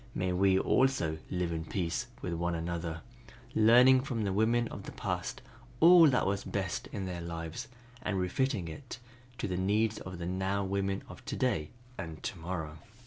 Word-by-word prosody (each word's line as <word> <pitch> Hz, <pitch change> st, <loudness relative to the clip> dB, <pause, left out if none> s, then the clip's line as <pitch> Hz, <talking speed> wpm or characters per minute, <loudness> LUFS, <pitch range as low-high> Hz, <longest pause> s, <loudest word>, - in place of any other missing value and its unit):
May 90 Hz, 0 st, 0 dB
we 95 Hz, +1 st, +4 dB
also 95 Hz, -10 st, +2 dB
live 90 Hz, -2 st, -1 dB
in 80 Hz, -1 st, -2 dB
peace 90 Hz, +6 st, -2 dB, 0.2 s
with 90 Hz, -, -2 dB
one 85 Hz, +1 st, -1 dB
another, 85 Hz, 0 st, -3 dB, 0.5 s
learning 125 Hz, +4 st, +7 dB
from 120 Hz, -4 st, -2 dB
the 100 Hz, -2 st, 0 dB
women 115 Hz, +3 st, +2 dB
of -, -, -7 dB
the -, -, -5 dB
past -, -, -4 dB, 0.4 s
all 170 Hz, 0 st, +9 dB
that 130 Hz, -4 st, +3 dB
was 100 Hz, 0 st, 0 dB
best 95 Hz, -3 st, -3 dB
in 100 Hz, -2 st, -5 dB
their 90 Hz, -2 st, -4 dB
lives 85 Hz, -1 st, -5 dB, 0.3 s
and 105 Hz, -6 st, -1 dB
refitting 95 Hz, 0 st, 0 dB
it 125 Hz, -, -8 dB, 0.4 s
to -, -, -2 dB
the 90 Hz, -2 st, -2 dB
needs 105 Hz, +4 st, +1 dB
of 95 Hz, -1 st, -7 dB
the 85 Hz, -, -5 dB
now 95 Hz, +2 st, -1 dB
women 95 Hz, 0 st, -1 dB
of -, -, -11 dB
to -, -, -3 dB
day 105 Hz, -13 st, 0 dB, 0.3 s
and 80 Hz, -4 st, -6 dB
to -, -, -4 dB
morrow." 80 Hz, -2 st, -5 dB
95 Hz, 180 wpm, -31 LUFS, 85-110 Hz, 0.5 s, all